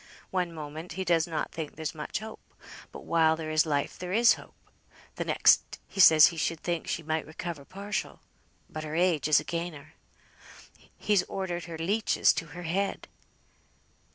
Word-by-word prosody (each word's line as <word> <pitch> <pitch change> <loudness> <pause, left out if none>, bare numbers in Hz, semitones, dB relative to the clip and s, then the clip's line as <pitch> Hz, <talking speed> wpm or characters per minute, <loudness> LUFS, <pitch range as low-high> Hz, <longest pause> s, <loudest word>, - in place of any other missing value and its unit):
One 180 -2 -1
moment 160 +1 -8
he 190 +2 -4
does 165 -2 +2
not 160 -3 -3
think 160 -3 -6
there's 160 +2 -4
much 155 +5 -5
hope 220 0 -8 0.5
but - - -10
while 160 -1 +3
there 160 -1 -5
is 155 +1 +3
life 145 -2 -1
there 180 0 -5
is 230 +3 +6
hope; - - -12 0.6
th' - - -4
next - - +3
he - - -9
says 160 -4 +9
he - - -9
should 165 0 -1
think 170 -2 -3
she 165 - -2
might 160 0 -2
recover 155 -2 -6
partial, 200 +5 -5 0.5
but 155 - -7
her 155 0 -5
age 170 -4 +2
is 155 - +5
again 170 0 -4
her. 145 0 -13 1.0
He's 205 -3 +2
ordered 175 -3 -4
her 165 -1 -7
leeches 200 +7 +2
to 165 - -4
her 175 - -6
head." 195 +4 -2
165 Hz, 175 wpm, -28 LUFS, 155-180 Hz, 1.0 s, says